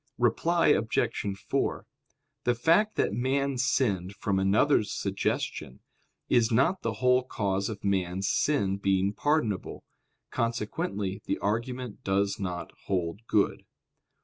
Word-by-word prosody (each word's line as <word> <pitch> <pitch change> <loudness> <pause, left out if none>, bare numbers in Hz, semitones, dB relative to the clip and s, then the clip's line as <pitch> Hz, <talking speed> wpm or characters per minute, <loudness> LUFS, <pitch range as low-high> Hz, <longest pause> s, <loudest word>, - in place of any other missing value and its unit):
Reply 160 +9 +2
Obj. 110 -6 0
4: - - -1 0.6
The 120 - +3
fact 170 - +3
that - - +1
man 135 +3 0
sinned 100 -8 0
from 100 -1 0
another's 105 +4 +3
suggestion, 100 0 -2 0.5
is 120 -1 +3
not 150 +11 +2
the 115 - -1
whole 125 0 +5
cause 100 -6 -2
of 110 - -7
man's 95 -1 0
sin 100 -10 +1
being 95 0 +1
pardonable. 115 -5 -1 0.5
Consequently 105 -4 -2
the - - -1
argument 120 +3 -3
does 100 +1 0
not 90 -3 -4
hold 95 +4 -2
good. 105 -2 +1
110 Hz, 120 wpm, -28 LUFS, 100-125 Hz, 0.6 s, whole